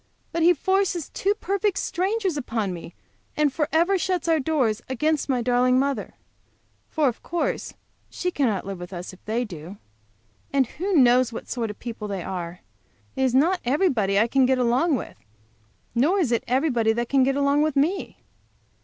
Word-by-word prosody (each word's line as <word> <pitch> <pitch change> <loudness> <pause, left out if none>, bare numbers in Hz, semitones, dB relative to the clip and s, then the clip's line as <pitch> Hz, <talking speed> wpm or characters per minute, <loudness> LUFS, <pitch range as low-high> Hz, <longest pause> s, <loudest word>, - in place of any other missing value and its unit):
But 335 - -2
he 345 +2 +5
forces 380 -1 0
two 400 +2 0
perfect 400 -1 -1
strangers 385 -1 -1
upon 225 -8 -2
me 170 0 -9 0.4
and 300 -3 +2
forever 330 +6 +2
shuts 360 -1 -1
our 325 -1 +3
doors 260 -7 0
against 300 +4 0
my 250 -3 +1
darling 250 +1 +3
mother. 275 +1 -1 0.7
For, 305 -2 +1
of 240 - -2
course, 345 0 -3 0.3
she 360 - -3
cannot 235 - 0
live 195 -2 -6
with 175 +2 -8
us 180 +1 -7
if 185 - -17
they 230 +3 -1
do. 175 -1 -9 0.7
And 275 -1 +3
who 370 - -3
knows 250 -3 +5
what 230 - -7
sort 235 -3 -2
of 210 - -7
people 230 -3 -6
they 195 -3 -4
are? 180 -2 -5 0.5
It - - -2
is 260 -1 +2
not 345 +7 +3
everybody 245 - +1
I 220 - +4
can 265 +1 +3
get 260 0 +2
along 255 +6 +2
with, 245 - -6 0.8
nor 290 +12 +2
is 320 -11 +1
it 235 - +1
everybody 245 -4 +2
can 270 +2 +2
get 270 +1 +2
along 280 +1 +2
with 305 -1 +1
me. 325 +8 0
265 Hz, 175 wpm, -24 LUFS, 230-325 Hz, 0.8 s, he